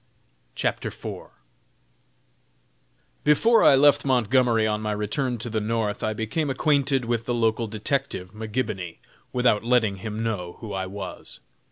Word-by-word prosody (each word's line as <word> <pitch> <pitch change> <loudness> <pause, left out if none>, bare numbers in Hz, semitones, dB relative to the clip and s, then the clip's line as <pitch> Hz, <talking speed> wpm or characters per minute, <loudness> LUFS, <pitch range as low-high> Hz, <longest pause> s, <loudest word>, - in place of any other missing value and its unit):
CHAPTER - - -1
IV. - - -7 2.0
Before 225 +10 +4
I - - +7
left 145 +1 +5
Montgomery 125 -3 +3
on 105 0 0
my 105 -1 -1
return 120 +5 -2
to 115 - -4
the 110 -1 -1
North, 110 -1 -1
I 110 - 0
became 110 +8 -2
acquainted 135 -1 +1
with 115 -1 -1
the 120 - 0
local 115 0 +1
detective, 105 -4 -2
McGibony, 110 -5 -4 0.3
without 125 -4 +2
letting 115 -4 +2
him 110 +3 -4
know 95 -6 -3
who 110 -3 -7
I 95 -1 -2
was. 100 +1 -8
115 Hz, 140 wpm, -25 LUFS, 105-125 Hz, 2.0 s, I